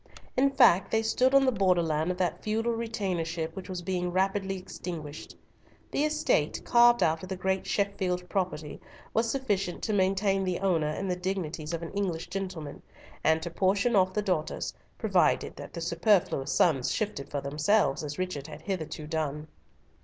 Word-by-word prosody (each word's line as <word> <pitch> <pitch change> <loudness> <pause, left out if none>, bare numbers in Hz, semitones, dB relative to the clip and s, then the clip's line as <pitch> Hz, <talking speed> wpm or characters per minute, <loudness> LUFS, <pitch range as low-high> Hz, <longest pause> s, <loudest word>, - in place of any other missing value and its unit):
In 275 +2 +4
fact, 240 -9 +5
they 220 0 +1
stood 255 +4 +2
on 275 0 +6
the 260 - +4
borderland 175 -6 +2
of 180 - -2
that 180 -2 -1
feudal 225 +2 0
retainership 180 -8 -2
which 190 0 -8
was 180 -1 -4
being 180 -1 -1
rapidly 195 +1 0
extinguished. 165 -5 -7 0.6
The 295 - +1
estate, 305 0 +1
carved 240 0 +6
out 160 0 +1
of 185 - -8
the 190 - -2
great 190 +1 -1
Sheffield 185 -3 -1
property, 175 -6 -3 0.3
was 230 +1 +2
sufficient 205 -9 -1
to 215 - 0
maintain 195 0 +2
the 185 -2 -1
owner 170 -6 +1
in 190 +6 -3
the 180 - 0
dignities 180 -4 -3
of 170 0 -3
an 165 - -6
English 180 -5 -2
gentleman, 180 -6 -5 0.4
and 160 +1 +3
to 170 - -4
portion 200 +6 +2
off 185 -1 +4
the 210 - 0
daughters, 180 -6 -1 0.2
provided - - +2
that - - -8
the 170 - -5
superfluous 170 -5 +2
sons 130 -3 +3
shifted 205 -10 -2
for 145 - -2
themselves, 150 +2 +1
as 145 -1 -5
Richard 180 -6 -3
had 155 - -10
hitherto 160 -5 -4
done. 150 -1 -3
185 Hz, 170 wpm, -28 LUFS, 160-200 Hz, 0.6 s, on